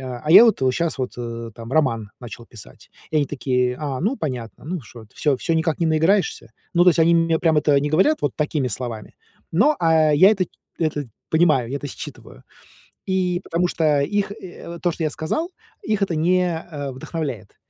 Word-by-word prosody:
"А, 125 -2 -6
а 155 - -1
я 225 - +10
вот 230 - +3
вот 130 - +3
щас 170 +1 -2
вот, 130 -1 -3
э, 115 -1 -5
там 115 +3 -9
роман 115 -9 +1
начал 120 -1 -10
писать". 110 -3 -15 0.2
И 155 - -1
они 145 -2 +2
такие: 125 -2 -1
"А, 140 -4 -3
ну 215 - 0
понятно. 125 - -5
Ну 170 +2 -4
что, 115 -1 -13
всё 145 -3 +1
всё 165 - -1
никак 160 -1 0
не 165 - +2
наиграешься?" 160 - +1 0.2
Ну, 175 - +5
то 180 - +7
есть 170 - -1
они 165 +1 +5
мне 165 -1 +2
прям 160 -2 +3
это 145 -1 +3
не 145 - -2
говорят 190 - +2
вот 145 - 0
такими 150 -3 -1
словами, 115 -1 -6 0.4
но, 280 - +3
а, 160 -2 +3
я 185 +8 +7
это 190 -4 +1 0.3
это 150 -5 -2 0.2
понимаю, 155 -7 +3
я 140 - -2
это 145 - -6
считываю. 65 - -10 0.6
И 180 -2 0
потому 175 +2 0
что 150 -4 +1
их, 200 +6 -1
э, 180 -4 -11
вот 170 0 -8
то, 175 -2 +1
что 165 - -6
я 155 - 0
сказал, 310 - -3 0.3
их 215 - -1
это 190 -4 0
не, 180 +4 +2 0.3
э, 145 -3 -5
вдохновляет. 130 - -6
155 Hz, 205 wpm, -22 LUFS, 130-175 Hz, 0.6 s, я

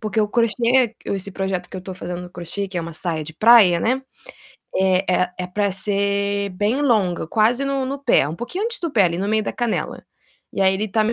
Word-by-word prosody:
porque 215 0 -1
o 210 - +1
crochê 235 +1 +2
esse 200 0 -3
projeto 190 -2 -3
que - - -7
eu - - -5
tô 190 0 -7
fazendo 180 -1 -6
no 180 - -10
crochê, 180 +3 -4
que 185 - -7
é - - -1
uma 165 0 -6
saia 165 -2 -2
de 160 - -8
praia, 215 -5 +6
né, 260 +3 0 0.7
é 190 0 +2
é 180 0 0
é 180 - -3
pra 200 +2 -1
ser 200 0 -1
bem 210 +9 0
longa, 195 - +1
quase 230 +8 +2
no 275 -1 -1
no 275 +1 -4
pé, 190 - +3
um 160 - -6
pouquinho 360 - -4
antes 470 +1 -2
do 335 -3 -2
pé, 205 -6 +4
ali 170 -1 0
no 200 +2 -2
meio 215 0 +2
da - - -3
canela. 240 -3 -3 0.5
E - - -4
aí 190 0 +4
ele 210 +2 -2
tá 215 +2 +1
m, 230 - +1
200 Hz, 235 wpm, -21 LUFS, 180-230 Hz, 0.7 s, praia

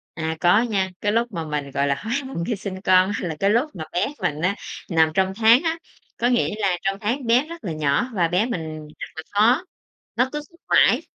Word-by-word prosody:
À, 160 -1 -3
có 180 +6 +5
nha, 200 -6 0
cái 205 - +1
lúc 235 +1 0
mà 165 -3 -4
mình 145 -2 -4
gọi 140 +1 0
là 140 - +2
hối 220 +11 -5
hận 170 -11 -4
khi 230 - 0
sinh 190 -1 -6
con 185 0 +4
á, 180 - -3
là 160 - -4
cái 195 - +2
lúc 240 +8 +2
mà 160 - -5
bé 175 - 0
mình 150 +1 -1
á, 190 +3 +1 0.3
nằm 160 -2 +3
trong 190 +1 +1
tháng 230 +6 +5
á. 325 0 0 0.4
Có 240 - +1
nghĩa 240 -4 +1
là 190 -4 +1
trong 195 0 0
tháng 245 +5 -1
bé 245 +5 +4
rất 335 -5 -9
là 175 - -3
nhỏ 155 - 0
và 175 -4 +2
bé 180 +6 +1
mình 160 -8 -5
rất - - -5
là 160 - -6
khó, 240 - +3 0.5
nó 250 +2 +2
cứ 300 - -3
thức 340 - -22
mãi, - - +5
195 Hz, 240 wpm, -23 LUFS, 165-235 Hz, 0.5 s, có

